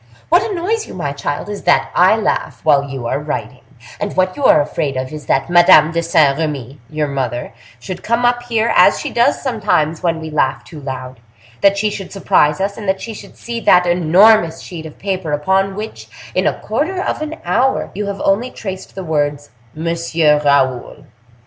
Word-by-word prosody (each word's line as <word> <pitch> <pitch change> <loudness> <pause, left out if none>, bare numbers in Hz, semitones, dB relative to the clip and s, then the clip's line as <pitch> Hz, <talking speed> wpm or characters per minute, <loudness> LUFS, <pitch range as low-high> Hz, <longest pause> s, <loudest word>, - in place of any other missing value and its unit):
What 345 +2 +5
annoys 425 +3 -2
you, - - -10
my 160 -6 -3
child, 145 +3 -4
is 205 -1 -6
that 175 - +3
I 185 +4 +5
laugh 220 - -2
while 145 -2 +4
you 135 -3 -6
are 120 - -1
writing; 130 -5 -5 0.4
and 205 -2 -4
what 185 0 +1
you 285 - -6
are - - +6
afraid 145 -2 -2
of 130 +2 -4
is 150 -3 -8
that 135 - +1
Madame 175 -2 +6
de 170 0 0
Saint 160 -4 +2
Remy, 145 -4 -4
your 155 -1 -2
mother, 130 -4 -3 0.3
should 185 +9 -7
come 235 +2 0
up 245 0 +2
here, 230 -1 0
as - - +5
she - - -4
does 240 0 +2
sometimes 205 - 0
when 165 -2 0
we 160 -1 -7
laugh 140 -3 0
too 155 - -11
loud, 130 -2 -7 0.4
that 200 0 +4
she 210 +1 0
should 195 -2 -7
surprise 185 -6 +2
us, 200 +1 -2
and 205 -3 -4
that 190 0 0
she 230 - -7
should - - -12
see 235 0 -5
that 180 -5 +4
enormous 175 +1 +4
sheet 160 -3 -8
of 155 - -14
paper 185 -6 -3
upon 190 +6 +1
which, 215 +2 -7 0.3
in - - +1
a - - 0
quarter 365 +5 -2
of 370 - -2
an 310 +1 -4
hour, 245 +10 +1
you 205 +1 -4
have 200 0 -4
only 215 +6 +1
traced 190 -6 -8
the 190 - -5
words 145 -3 -2 0.2
Monsieur 165 -2 +1
Raoul. 130 -4 +1
175 Hz, 200 wpm, -17 LUFS, 150-205 Hz, 0.4 s, are